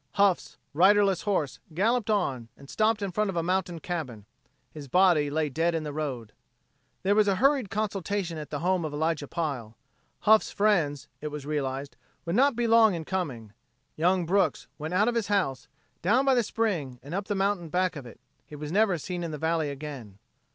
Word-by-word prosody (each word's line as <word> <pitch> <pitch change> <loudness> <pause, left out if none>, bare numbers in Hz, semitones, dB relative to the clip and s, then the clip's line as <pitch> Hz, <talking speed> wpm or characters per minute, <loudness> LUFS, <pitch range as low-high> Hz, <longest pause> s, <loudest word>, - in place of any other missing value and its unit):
Huff's 200 -3 +1 0.2
riderless 195 +3 +4
horse 175 -10 -1 0.2
galloped 225 +4 +1
on 140 - 0
and 140 0 -13
stopped 215 -1 +1
in 195 - -2
front 210 +3 0
of 190 - -4
a 170 - 0
mountain 180 -1 -1
cabin; 140 - -5 0.5
his 150 -2 -9
body 175 -2 +4
lay 155 +1 0
dead 165 +4 0
in 160 - -2
the 150 -1 -5
road. 130 -8 -4 0.7
There 195 +2 +3
was 210 0 +4
a 195 - +3
hurried 265 0 +2
consultation 200 -4 -2
at 150 - -8
the 145 -1 -4
home 180 0 +1
of 155 -2 -4
Elijah 155 -1 -1
Pile. 135 -10 -4 0.4
Huff's 220 0 +5
friends, 165 - +1
it 155 - -4
was 150 -2 -6
realized, 140 -2 -3 0.3
would 170 +2 -1
not 275 +2 +4
be 240 0 0
long 225 -3 +5
in 160 -1 -5
coming. 130 - -4 0.4
Young 180 +2 +2
Brooks 195 +4 +1
went 155 +4 -4
out 210 +4 +3
of 240 - +2
the 230 - +1
house, 195 -11 -1 0.3
down 235 - +3
by 270 - +4
the 245 - +4
spring, 185 - -2
and 145 +4 -8
up 195 +2 -2
the 205 -1 -2
mountain 195 -3 0
back 180 +1 0
of 135 -4 -8
it. 115 - -13 0.3
He 150 - -10
was 150 +1 -6
never 200 -1 +3
seen 175 +3 -5
in 170 - -3
the 150 - -5
valley 160 0 0
again. 135 -8 -8
175 Hz, 200 wpm, -27 LUFS, 150-200 Hz, 0.7 s, Huff's